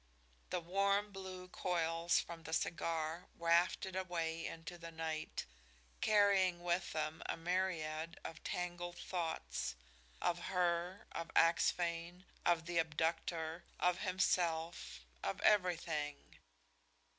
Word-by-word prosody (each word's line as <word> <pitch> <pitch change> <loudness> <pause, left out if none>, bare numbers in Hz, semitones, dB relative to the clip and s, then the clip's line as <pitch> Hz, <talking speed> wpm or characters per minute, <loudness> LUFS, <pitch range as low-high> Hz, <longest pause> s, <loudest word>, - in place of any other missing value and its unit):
The 180 - 0
warm, 200 +4 +2
blue 190 -1 -7
coils 170 -2 +1
from 170 -1 -5
the 160 0 -6
cigar 165 +1 -1
wafted 170 +2 +3
away 165 -3 -1
into 165 +1 -7
the 165 0 -7
night, 160 -1 -3 0.6
carrying 195 -4 +4
with 175 +1 0
them 155 +1 -2
a - - -1
myriad 165 -2 -1
of 160 - -7
tangled 175 0 -3
thoughts, 160 - -2 0.4
of 175 0 0
her, 180 0 0
of 165 - -4
Axphain, 170 +1 +3 0.2
of 170 -2 +3
the 170 0 +1
abductor, 160 +1 0 0.2
of 180 0 +3
himself, 170 - 0 0.2
of 100 - -2
everything. 165 -7 +1
170 Hz, 110 wpm, -37 LUFS, 165-180 Hz, 0.6 s, carrying